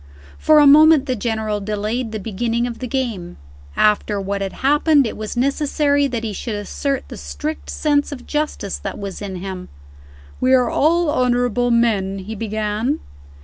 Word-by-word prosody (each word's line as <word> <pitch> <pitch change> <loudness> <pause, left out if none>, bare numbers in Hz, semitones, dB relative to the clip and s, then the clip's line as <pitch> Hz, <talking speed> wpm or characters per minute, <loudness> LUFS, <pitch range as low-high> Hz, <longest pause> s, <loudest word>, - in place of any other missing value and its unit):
For 310 - +5
a 295 - +7
moment 305 0 +7
the 255 -3 -1
General 220 -2 -2
delayed 215 +3 -3
the 220 - -3
beginning 230 +4 -2
of 240 -2 -5
the 255 - -4
game. 230 -9 -3 0.4
After 210 -1 +2
what 200 0 -3
had 195 -1 -2
happened, 295 0 +4
it 225 - -4
was 215 +2 -6
necessary 285 +2 +1
that 240 -4 -4
he 220 -2 -3
should 220 +2 -4
assert 265 +6 -3
the - - -9
strict 305 +1 -5
sense 290 -1 0
of 255 -3 -8
justice 300 -9 -3
that 195 - -5
was 200 -1 -6
in 195 -2 -5
him. 185 0 -6 0.7
"We 260 +1 +4
are 250 -2 +2
all 330 +1 +2
honorable 245 -2 +1
men," 215 -5 +1
he 195 +3 -7
began. 215 +5 -2
235 Hz, 170 wpm, -20 LUFS, 210-280 Hz, 0.7 s, a